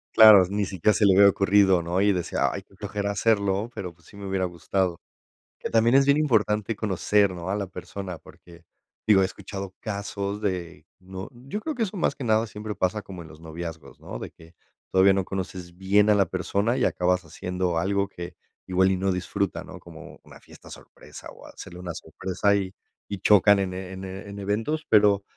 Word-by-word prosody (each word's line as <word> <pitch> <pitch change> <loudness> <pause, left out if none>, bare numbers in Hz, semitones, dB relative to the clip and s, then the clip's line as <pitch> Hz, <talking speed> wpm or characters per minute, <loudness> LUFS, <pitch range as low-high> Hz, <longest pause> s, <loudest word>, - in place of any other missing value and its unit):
Claro, 110 -4 +9
ni 100 +1 -1
siquiera 95 +2 +1
se 105 - +2
le 95 -2 +5
había 100 +1 +8
ocurrido, 100 -2 +3
¿no? 85 +3 -1
y 100 0 +4
decía: 90 -3 0
"Ay, - - -6
qué - - -24
flojera 100 0 -3
hacerlo, 100 0 +1
pero, 90 -6 -6
pues, 85 -1 -25
sí 100 - -15
me 100 - -8
hubiera 95 -1 -1
gustado". 90 0 -1 0.6
Que - - -4
también 115 +2 +3
es 135 0 +6
bien 140 +1 +4
importante 110 -7 +1
conocer, 100 0 +1
¿no? 90 0 -6
a 100 - 0
la 100 -2 -3
persona, 95 -1 -7
porque, 85 +1 -17 0.4
digo, 105 -3 +6
he - - +3
escuchado 95 0 -7
casos 100 -1 -4
de, 90 -4 -4
¿no? 95 0 -8
yo 135 - -7
creo 315 - -3
que 245 -5 -1
eso 210 -1 -4
más 170 -6 0
que 135 - -6
nada 110 0 +2
siempre 105 0 -6
pasa 95 +3 -1
como 95 -3 -10
en 80 - -12
los 80 - -14
noviazgos, 80 -3 -8
¿no? - - -7
de - - -6
que 80 +1 -19 0.4
todavía 95 +1 +5
no 95 0 0
conoces 90 -2 -6
bien 100 +2 +3
a 105 - +5
la 100 -1 +3
persona 100 +5 -1
y 130 - 0
acabas 90 -3 +1
haciendo 90 +2 -3
algo 100 +3 0
que 90 -2 -8 0.3
igual 95 +1 +3
y 95 - 0
no 95 +1 0
disfruta, 95 +1 -2
¿no? - - -11
como - - -13
una - - -16
fiesta - - -16
sorpresa - - -12
o - - -15
hacerle 90 - -11
una 90 -1 -5
sorpresa 100 +5 -1
y 95 -2 -2 0.3
y 100 - -5
chocan 100 +1 +5
en 95 -1 -2
en 95 0 -7
en 100 +2 -8
eventos, 110 +11 -2
pero 105 -2 +4
95 Hz, 205 wpm, -25 LUFS, 90-105 Hz, 0.6 s, Claro